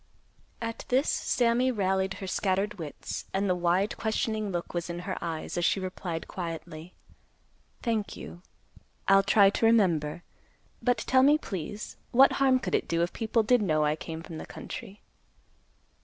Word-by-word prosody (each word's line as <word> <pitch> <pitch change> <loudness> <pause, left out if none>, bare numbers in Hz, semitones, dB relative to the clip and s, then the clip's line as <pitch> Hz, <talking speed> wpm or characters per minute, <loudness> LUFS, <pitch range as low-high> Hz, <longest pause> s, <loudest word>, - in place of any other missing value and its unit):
At 230 0 -4
this, 260 +4 +2
Sammy 245 +1 +2
rallied 190 -3 0
her 195 - -7
scattered 195 +2 -1
wits, 150 -4 -6
and 200 +1 +1
the 185 - +3
wide, 180 +3 +1
questioning 220 -2 -1
look 175 -1 -4
was 175 0 -3
in 170 0 -4
her 185 - -2
eyes, 165 0 -3
as - - -1
she - - +2
replied 185 -3 -5
quietly, 165 -1 -7 0.9
"Thank 225 -4 -1
you. 175 - -9 0.7
I'll 195 0 +7
try 200 0 +5
to 225 - 0
remember. 175 -8 +2 0.6
But 245 -2 +2
tell 260 +4 +3
me, 290 +3 +6
please, 205 - -6
what 265 +3 +6
harm 265 -1 +5
could 190 -8 -4
it - - +1
do, 170 0 +1
if 175 - -2
people 225 0 +1
did 245 +2 +4
know 155 -6 +2
I 150 +1 +2
came 160 +1 -7
from 165 -2 -8
the - - -8
country?" 210 -3 -8
195 Hz, 165 wpm, -28 LUFS, 175-225 Hz, 0.9 s, I'll